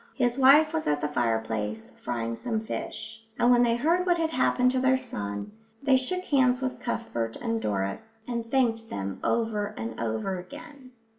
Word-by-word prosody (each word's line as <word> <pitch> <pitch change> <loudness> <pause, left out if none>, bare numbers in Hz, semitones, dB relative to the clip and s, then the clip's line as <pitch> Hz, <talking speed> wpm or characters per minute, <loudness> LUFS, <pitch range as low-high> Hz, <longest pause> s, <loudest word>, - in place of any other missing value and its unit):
His 245 -2 +1
wife 295 +4 +7
was 320 - -1
at 145 0 +2
the 150 - -1
fireplace, 110 -4 -2
frying 115 -1 -3
some 225 - -2
fish; 220 0 -6
and 240 - +4
when 245 -1 +6
they 235 -1 +3
heard 330 +9 +2
what 350 -1 +2
had 325 -1 0
happened 250 -3 +3
to 260 - 0
their 260 0 +4
son, 100 - -5 0.3
they 275 -1 +5
shook 365 +9 -1
hands 255 -6 +3
with 260 -1 -3
Cuthbert 120 - -3
and 230 -1 -2
Doris 100 - -3
and 235 -2 -3
thanked 230 -4 +1
them 95 -1 -4
over 220 -3 0
and 110 0 -5
over 115 - -2
again. 285 - -11
230 Hz, 175 wpm, -27 LUFS, -, 0.3 s, wife